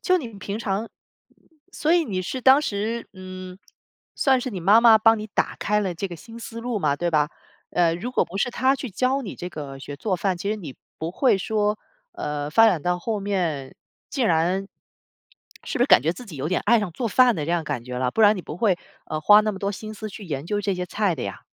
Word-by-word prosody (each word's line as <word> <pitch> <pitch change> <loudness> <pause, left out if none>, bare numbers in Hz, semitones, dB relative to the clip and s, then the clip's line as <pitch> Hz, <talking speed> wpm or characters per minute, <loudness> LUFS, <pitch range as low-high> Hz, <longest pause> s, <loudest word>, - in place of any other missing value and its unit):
就 370 -1 +3
你 250 -7 -6
平 200 +2 -5
常 210 +1 -2 0.8
所 310 - -1
以 345 -2 +4
你 185 -6 -2
是 255 +8 -4
当 265 +3 +6
时， 220 -2 -3
嗯， 185 0 -9 0.6
算 265 -2 +3
是 255 - -4
你 190 -5 -5
妈 200 +6 +6
妈 225 -2 +7
帮 225 0 +5
你 215 - -5
打 - - -1
开 210 0 +1
了 190 -3 -2
这 195 +4 -3
个 175 - -8
新 230 +8 -12
思 230 0 -7
路 240 -2 -2
嘛， 145 -6 +1
对 175 +1 -1
吧？ 150 -1 +2 0.4
呃， 170 -2 +2
如 235 +9 -5
果 - - +2
不 190 - -8
是 245 - 0
她 260 +3 +2
去 260 -4 -6
教 260 +7 0
你 205 - -6
这 180 - -6
个 140 -5 -8
学 140 +1 -8
做 195 +3 -1
饭， 185 0 0
其 200 +4 -3
实 215 - -1
你 155 -10 -9 0.2
不 160 +1 -3
会 250 0 +2
说， 210 +1 0 0.3
呃， 145 0 -4
发 225 +8 +6
展 180 -9 +2
到 180 +1 0
后 210 +2 -3
面， 170 -9 -2 0.4
竟 260 -5 0
然 180 +4 +1 1.0
是 - - -3
不 - - +4
是 250 - +3
感 - - +6
觉 165 +3 +1
自 240 +7 -11
己 165 -8 -9
有 135 - -3
点 180 - 0
爱 235 +1 +6
上 205 -4 -2
做 235 +5 -2
饭 250 +1 +5
的 150 -1 -3
这 - - -2
样 170 -2 0
感 145 -6 -3
觉 125 0 -6
了， 125 0 0
不 225 - -2
然 210 -1 +6
你 180 - -5
不 150 - -7
会， 205 -6 +3 0.3
呃， 155 - -3
花 210 +6 +7
那 215 - 0
么 195 - -7
多 200 0 -2
心 215 +2 -7
思 215 0 -7
去 205 - -9
研 145 -4 -4
究 205 +4 -1
这 200 -1 -1
些 180 0 -3
菜 195 -1 0
的 130 - -6
呀。 - - -6
200 Hz, 265 characters per minute, -24 LUFS, 170-225 Hz, 1.0 s, 妈